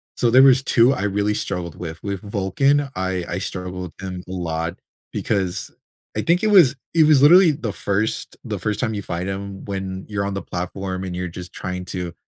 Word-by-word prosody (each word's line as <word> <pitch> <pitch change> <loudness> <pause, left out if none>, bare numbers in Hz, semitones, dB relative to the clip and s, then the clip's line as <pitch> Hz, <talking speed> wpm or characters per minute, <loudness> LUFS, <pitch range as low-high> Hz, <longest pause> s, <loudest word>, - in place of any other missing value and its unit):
So 120 - +2
there 130 +3 +7
was 135 -1 +6
2 125 +1 +4
I 100 - -3
really 105 +1 +1
struggled 90 -5 -3
with. 85 -2 -7
With 100 -2 -3
Vulcan, 135 +9 +1
I 95 -1 -1
I 90 - -3
struggled 90 -2 -5
with 95 - -5
him 90 -1 -6
a 90 - -8
lot, 85 -2 -3 0.3
because 95 -4 -2 0.5
I - - +1
think 175 +4 +2
it - - +3
was 185 -11 +6 0.2
it 165 -2 +5
was 150 -4 +6
literally 170 +4 +8
the 125 -7 -3
first 100 +2 -2
the - - -4
first 105 -1 -2
time 110 - 0
you 100 - -3
fight 90 +1 -3
him, 95 0 -5
when 95 -1 -4
you're 100 -1 -1
on 100 - -2
the 100 - -3
platform 95 +1 -4
and 90 -1 -4
you're 90 0 -3
just 90 +1 -9
trying 90 -1 -5
to 90 -2 -5
95 Hz, 210 wpm, -22 LUFS, 90-115 Hz, 0.5 s, literally